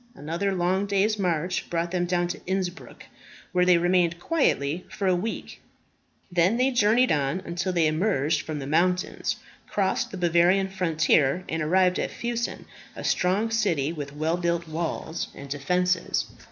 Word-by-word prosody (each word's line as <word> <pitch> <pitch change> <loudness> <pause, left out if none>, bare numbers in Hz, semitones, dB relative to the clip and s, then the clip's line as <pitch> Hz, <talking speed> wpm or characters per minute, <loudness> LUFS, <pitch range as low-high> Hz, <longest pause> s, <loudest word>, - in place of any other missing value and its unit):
Another 170 +7 -2
long 185 +2 0
day's 200 +2 +1
march 180 -1 -1
brought 170 0 -1
them 175 -1 0
down 175 0 +1
to 175 - -5
Innsbruck, 190 0 -4 0.5
where 180 -1 +3
they 180 -1 +6
remained 175 -1 +2
quietly 175 - 0
for 200 - -4
a 185 -1 +4
week. 210 +6 -5 0.7
Then 180 +5 +3
they 255 +2 +2
journeyed 240 +1 +3
on 145 +3 +1
until 175 +1 -3
they 170 -3 +2
emerged 155 -2 +1
from 155 -1 -5
the 140 - -5
mountains, 180 +5 0 0.3
crossed 195 -2 0
the 195 - -7
Bavarian 175 +2 +3
frontier, 165 -4 +2
and 160 0 -2
arrived 180 +3 +3
at - - -1
Fussen, 235 0 -4 0.3
a - - -7
strong 200 +5 +1
city, 170 -10 +1
with 145 -3 -7
well 160 +3 0
built 170 -1 -1
walls 160 0 -3
and 140 - -9
defences. 180 +6 0
175 Hz, 155 wpm, -26 LUFS, 165-190 Hz, 0.7 s, they